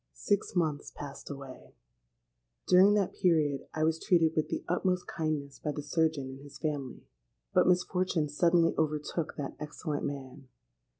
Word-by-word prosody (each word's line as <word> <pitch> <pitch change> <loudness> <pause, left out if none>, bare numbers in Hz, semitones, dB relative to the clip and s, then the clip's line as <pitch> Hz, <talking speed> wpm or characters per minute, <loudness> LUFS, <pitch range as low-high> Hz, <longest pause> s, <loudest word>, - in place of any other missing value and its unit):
"Six 200 - -1
months 155 -5 0
passed 140 -1 -9
away: 135 -2 -9 0.9
during 190 +3 +7
that 200 -3 +1
period 155 -7 +1
I 155 - -1
was 160 0 +2
treated 165 -3 +3
with 155 - +1
the - - -3
utmost 180 +1 0
kindness 150 -3 -3
by 150 - -2
the 145 - -5
surgeon 155 -2 +1
and 130 0 -8
his 145 -1 -12
family. 145 -5 -3 0.5
But - - +4
misfortune 180 -3 +2
suddenly 165 +3 +3
overtook 155 +1 -1
that 145 - -4
excellent 150 0 -4
man. 135 -1 -6
155 Hz, 145 wpm, -30 LUFS, 145-175 Hz, 0.9 s, during